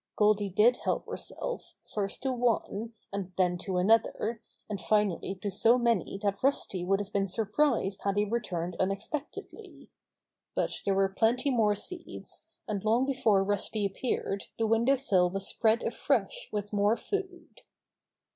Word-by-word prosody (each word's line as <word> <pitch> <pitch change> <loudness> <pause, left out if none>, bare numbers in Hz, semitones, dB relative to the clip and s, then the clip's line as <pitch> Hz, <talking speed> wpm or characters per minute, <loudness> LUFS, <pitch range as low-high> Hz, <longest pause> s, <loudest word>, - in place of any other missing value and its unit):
j - - -63
Goldy 210 -1 +3
did 220 +6 +4
help - - -1
herself, - - -5
first 200 +1 -3
to 265 - +1
one, 235 -2 -1 0.2
and 195 -2 -4
then 180 -1 +3
to 185 0 -2
another, 225 +3 +2 0.3
and 205 -3 -4
finally 205 -3 +1
to 205 - -1
so 230 +5 +4
many 235 -6 +1
that 200 -1 0
Rusty 255 -9 +1
would 195 +2 +2
have 205 0 -6
been 195 -1 +1
surprised 215 0 0
had 200 0 0
he 205 - +3
re 230 +3 0
turned 175 -5 -4
unexpectedly. 200 +10 -5 0.6
But - - 0
there 195 - +2
were 195 0 +3
plenty 245 +6 +2
more 215 -4 +3
seeds, 350 - -8 0.2
and 205 -3 -2
long 230 +4 +3
before 225 -8 +3
Rusty 205 +1 0
appeared 200 -1 -2
the 225 - +1
window 230 +5 +3
sill 190 -9 +2
was 195 +1 -3
spread 225 +1 +2
afresh - - -1
with 205 0 -4
more 205 +2 +3
food. 390 +3 -5
210 Hz, 155 wpm, -29 LUFS, 195-235 Hz, 0.6 s, did